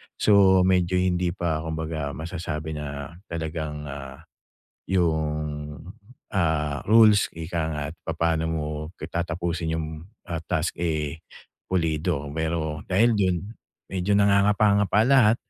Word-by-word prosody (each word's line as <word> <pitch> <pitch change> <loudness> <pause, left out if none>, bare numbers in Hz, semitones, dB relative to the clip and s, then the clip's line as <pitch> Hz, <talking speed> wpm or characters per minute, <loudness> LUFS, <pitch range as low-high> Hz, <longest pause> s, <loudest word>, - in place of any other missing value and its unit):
So, 95 -3 +5
medyo 90 -1 +2
hindi 90 -1 +1
pa 85 -4 -1
kumbaga 80 -2 -4
masasabi 80 0 -4
na 75 +1 -6
talagang, 80 -2 -4
ah, 70 -2 -8 0.7
'yung, 75 -4 -1 0.6
ah, 75 -6 0
rules 110 -2 +6
ika 85 +1 -3
nga't 75 0 -4
papaano 80 0 0
mo 80 -2 -2 0.3
k 75 - -5
tatapusin 85 -1 -2
'yung, 80 -1 -3 0.4
ah, 85 -1 -4
task, 80 +1 -1
eh, 80 -2 -2 0.5
pulido. 80 -5 0
Pero 80 -2 -2
dahil 115 +5 +4
do'n, 95 -4 +2 0.6
medyo 100 +2 +2
nangangapa-ngapa 100 0 +4
lahat. 125 -5 +5
80 Hz, 110 wpm, -25 LUFS, 75-95 Hz, 0.7 s, rules